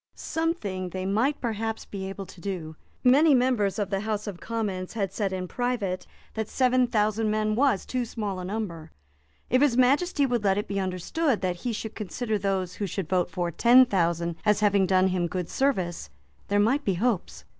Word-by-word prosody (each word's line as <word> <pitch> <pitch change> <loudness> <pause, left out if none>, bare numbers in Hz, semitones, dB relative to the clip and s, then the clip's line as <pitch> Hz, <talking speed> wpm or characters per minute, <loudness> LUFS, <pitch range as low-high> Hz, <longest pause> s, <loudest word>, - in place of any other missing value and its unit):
Something 210 - -2
they 185 +1 -4
might 230 +9 +1
perhaps 225 -1 -3
be 190 -1 -6
able 195 0 -6
to 180 - -14
do. 170 -5 -5 0.3
Many 280 +4 +6
members 245 -6 +2
of 205 -2 -2
the 195 - 0
House 215 0 -2
of 195 -4 -6
Commons 200 -5 -3
had 200 -4 -2
said 195 -1 -1
in 185 -1 -3
private 230 -6 -2 0.3
that 220 -1 -3
seven 255 -1 +3
thousand 215 -1 +1
men 215 0 +1
was 250 -4 +2
too 255 -1 -1
small 210 -5 -4
a - - -5
number. 180 -5 -4 0.6
If 255 +2 +4
His 275 -5 +3
Majesty 280 +4 +3
would 240 -4 0
let 195 -1 +2
it 205 - -2
be 200 -1 -2
understood 195 - -1
that 180 -2 -1
he 240 +7 -3
should 220 0 -5
consider 215 +1 -3
those 190 -2 -1
who 205 - -3
should 185 -2 -4
vote 180 -2 +1
for 175 0 -2
ten 245 +8 +6
thousand 170 -5 0
as 210 -1 +2
having 200 -2 +3
done 185 0 +3
him 180 -2 0
good 180 0 -4
service, 185 - -1 0.4
there 205 0 +2
might 255 +8 +2
be 195 - 0
hopes. 215 0 -1
205 Hz, 195 wpm, -26 LUFS, 185-240 Hz, 0.6 s, Many